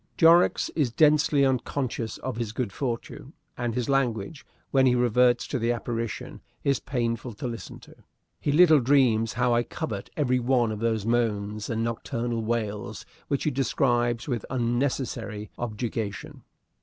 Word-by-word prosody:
Jorrocks 170 +1 +5
is 145 -7 0
densely 150 0 +4
unconscious 130 -2 -2
of 130 -3 -5
his 115 -2 -3
good 115 -4 -3
fortune; 130 +2 -5 0.2
and 120 -2 -3
his 125 -2 -1
language, 135 -1 -1 0.3
when 135 -1 +4
he 125 - +4
reverts 120 0 +3
to 130 - -3
the 115 +1 +1
apparition, 115 -1 -4 0.2
is 140 -2 +2
painful 120 -2 -2
to 105 - -7
listen 115 -2 -6
to. - - -15 0.5
He 145 - 0
little 155 0 +6
dreams 120 -4 +3
how 125 0 +2
I 120 - +3
covet 100 -4 -5
every 130 -4 +2
one 120 -2 +2
of 105 - -4
those 110 -2 0
moans 105 -3 -1
and 115 -1 -1
nocturnal 115 0 -2
wails 110 -2 -3 0.2
which 140 - -1
he 150 - +1
describes 120 -3 +1
with 120 -6 -2
unnecessary 120 -4 -2
objurgation. 110 -2 -4
120 Hz, 150 wpm, -26 LUFS, 115-130 Hz, 0.5 s, little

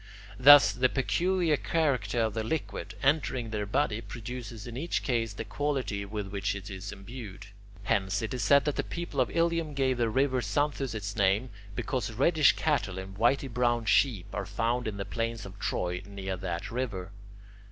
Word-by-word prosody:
Thus, 145 +2 +9
the 130 +1 +2
peculiar 170 +4 +1
character 125 -11 0
of 110 -2 0
the 110 - -2
liquid, 155 +8 -4
entering 135 -5 +1
their 105 -2 -2
body, 115 -1 0
produces 115 0 -7
in 120 -1 -7
each 160 +7 -2
case 115 -4 0
the 115 +2 -6
quality 120 -4 -2
with 105 -1 -5
which 100 0 -2
it 100 +1 -7
is 95 +1 -6
imbued. 105 -1 -9 0.4
Hence, 100 -1 0
it 110 - -3
is 125 - -2
said 140 0 +5
that 150 - -1
the - - +1
people 170 -6 -3
of 125 - +1
Ilium 165 -3 0
gave 130 -2 +1
the 115 -1 +2
river 130 +1 +1
Xanthus 140 -4 -1
its 100 -1 -4
name 100 +4 +2 0.2
because 120 -3 -2
reddish 150 +5 +4
cattle 105 -12 0
and 95 +1 -7
whity 120 +6 +2
brown 120 -2 +1
sheep 110 -5 +3
are 100 -3 -3
found 115 +4 -1
in 105 -2 -4
the 100 - -3
plains 115 +2 -3
of 100 +1 -11
Troy 90 -3 -2
near 95 -1 -4
that 90 -1 -4
river. 105 -7 -3
115 Hz, 180 wpm, -29 LUFS, 100-135 Hz, 0.4 s, Thus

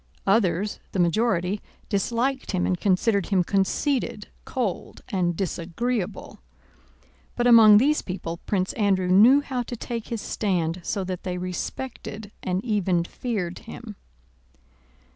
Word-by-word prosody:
Others, 195 -1 +1
the 190 - -1
majority, 185 +1 +1 0.3
disliked 235 +6 -1
him 180 - +1
and 185 - +1
considered 200 0 +2
him 190 -3 +2
conceited, 215 - 0 0.2
cold, 230 -9 -3
and 175 -3 0
disagreeable. 195 +4 -3 1.0
But 240 - 0
among 225 -3 +8
these 290 +7 +3
people 170 -3 -5
Prince 190 -2 0
Andrew 195 -4 +1
knew 230 +10 +7
how 260 -3 -3
to 240 0 -5
take 230 0 -5
his 230 - -3
stand 180 -5 -1
so 195 - -2
that 185 -1 -4
they 180 -1 -4
respected 210 +3 -5
and 185 +3 -2
even 190 -6 +1
feared 185 -3 -4
him. 225 -2 -9
200 Hz, 125 wpm, -25 LUFS, 180-230 Hz, 1.0 s, among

